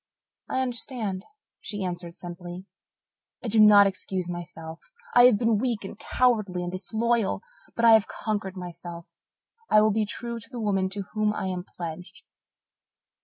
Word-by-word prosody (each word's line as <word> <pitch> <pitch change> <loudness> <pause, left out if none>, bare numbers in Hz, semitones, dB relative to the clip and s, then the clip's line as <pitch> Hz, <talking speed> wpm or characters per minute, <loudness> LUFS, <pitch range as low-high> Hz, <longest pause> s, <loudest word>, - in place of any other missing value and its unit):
"I 260 - 0
understand," 235 -6 -3 0.3
she 205 -2 -4
answered 175 -1 -5
simply. 175 +1 -8 0.8
"I 235 - -2
do 220 +1 +3
not 210 -1 +9
excuse 190 -2 -2
myself 165 -2 -7 0.3
I 245 0 +8
have 250 -4 +6
been 230 -1 +2
weak 235 -3 -1
and - - -7
cowardly 215 -8 +1
and 175 - -4
disloyal. 220 +3 0 0.3
But 235 - +2
I 230 - +8
have 220 -2 +6
conquered 205 -3 -3
myself 175 -1 -8 0.6
I 215 - +6
will 215 0 +4
be 215 +1 +1
true 235 +2 -3
to 230 +1 -12
the 250 -2 -7
woman 195 -3 +1
to 200 +1 -3
whom 215 -1 +1
I - - -3
am 180 -1 -3
pledged. 175 0 -8
200 Hz, 160 wpm, -26 LUFS, 180-225 Hz, 0.8 s, not